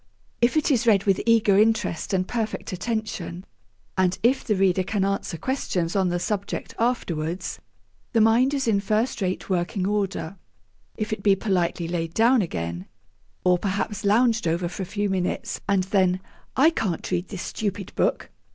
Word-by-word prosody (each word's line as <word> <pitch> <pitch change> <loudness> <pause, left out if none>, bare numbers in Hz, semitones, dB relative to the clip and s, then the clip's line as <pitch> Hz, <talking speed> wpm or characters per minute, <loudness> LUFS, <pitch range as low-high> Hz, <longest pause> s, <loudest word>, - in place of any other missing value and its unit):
If 240 +6 +3
it 305 0 +2
is 240 -3 +2
read 200 -3 +5
with 195 -2 +2
eager 215 -4 +5
interest 215 -5 +1
and 185 -1 +1
perfect 225 -5 -3
attention, 190 -3 -4 0.5
and 185 -1 +2
if 255 +3 +3
the 215 - +1
reader 190 -1 +3
can 195 +1 0
answer 195 -3 -2
questions 180 - -2
on 190 -2 +2
the 175 - 0
subject 195 +3 -3
afterwards, 180 -8 -1 0.5
the - - +2
mind 235 +5 +4
is 270 -3 -1
in 210 -3 +3
first 215 +3 0
rate 185 -1 -2
working 185 +1 -1
order. 200 -3 -2 0.6
If 215 0 -2
it 215 - -4
be 200 -1 +4
politely 180 -4 0
laid 165 -1 -3
down 235 +2 +5
again, 85 - -4 0.6
or 180 -1 +4
perhaps 200 +1 -2
lounged 225 0 +3
over 170 +2 0
for 180 - -6
a 185 - -3
few 205 +2 -1
minutes, 185 -2 -2
and 195 -2 +3
then, 185 -1 +2 0.4
'I 300 +5 +5
can't 190 - -2
read 180 0 -1
this 195 -2 -6
stupid 200 -2 -4
book! - - 0
195 Hz, 170 wpm, -24 LUFS, 180-220 Hz, 0.6 s, read